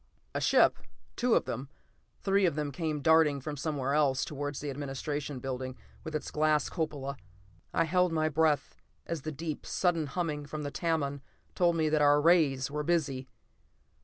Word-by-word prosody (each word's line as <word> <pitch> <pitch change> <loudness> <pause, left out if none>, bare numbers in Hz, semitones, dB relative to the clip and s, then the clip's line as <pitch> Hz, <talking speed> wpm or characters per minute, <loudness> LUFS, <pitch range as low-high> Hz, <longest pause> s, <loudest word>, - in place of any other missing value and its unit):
A - - -2
ship, - - +4 0.4
two 245 -1 +2
of - - +2
them, 130 +3 -5 0.5
three 195 -1 +3
of 160 - -1
them 150 -2 -2
came 155 0 -2
darting 160 -3 +5
from 145 +2 -5
somewhere, 140 -2 -2 0.3
towards 145 -1 -4
the 145 -1 -4
administration 140 +1 -4
building, 130 0 -4 0.3
with 160 - -5
its 155 - -3
glass 155 -1 +2
cupola. 145 -5 -3 0.5
I - - +2
held 180 +2 +2
my 155 -1 +1
breath 155 -1 +1 0.3
as 165 -3 -3
the 155 - -4
deep, 155 +1 -5
sudden 170 -4 0
humming 150 -2 -3
from 150 0 -5
the 145 - -4
Tamon 145 -4 -1 0.3
told 175 -2 +3
me 160 -1 +2
that 155 -1 +2
our 145 0 +6
rays 145 -5 +3
were 150 +1 -2
busy. 145 -5 0
150 Hz, 165 wpm, -30 LUFS, 140-160 Hz, 0.5 s, our